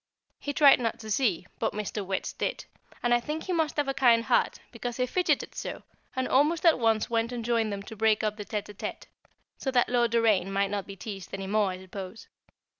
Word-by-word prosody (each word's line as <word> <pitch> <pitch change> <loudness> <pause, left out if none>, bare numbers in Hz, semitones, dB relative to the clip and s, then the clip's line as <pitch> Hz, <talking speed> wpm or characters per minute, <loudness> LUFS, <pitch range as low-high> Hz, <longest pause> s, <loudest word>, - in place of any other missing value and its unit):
He 285 - -3
tried 285 -2 +6
not 230 -2 -1
to 220 -1 -7
see, 205 -7 +1
but - - 0
Mr. 210 0 -3
Wertz 190 0 -3
did, - - -3 0.4
and 240 0 +3
I 240 - +5
think 300 +6 -4
he 370 - -2
must 320 -3 0
have 290 -1 +1
a 270 - 0
kind 235 -4 +4
heart, - - +2
because 240 0 -5
he 250 - +2
fidgeted 360 +8 0
so, - - -6 0.3
and 260 0 0
almost 300 +5 +2
at 330 -5 +6
once 225 -2 +2
went 230 0 0
and 240 -2 -4
joined 230 -2 +1
them 200 0 -4
to 220 - -9
break 220 0 +2
up 215 -1 0
the 210 - -6
tête 210 0 -3
à 210 - -10
tête, 205 - -6 0.6
so 270 - -2
that 250 -2 +2
Lord 240 -1 +3
Doraine 220 -5 +2
might 195 0 +1
not 200 -2 -3
be 195 - -8
teased 195 -2 -7
any 195 0 -5
more, 205 0 +2
I 185 0 -6
suppose. 190 +2 -8
225 Hz, 230 wpm, -28 LUFS, 205-250 Hz, 0.6 s, tried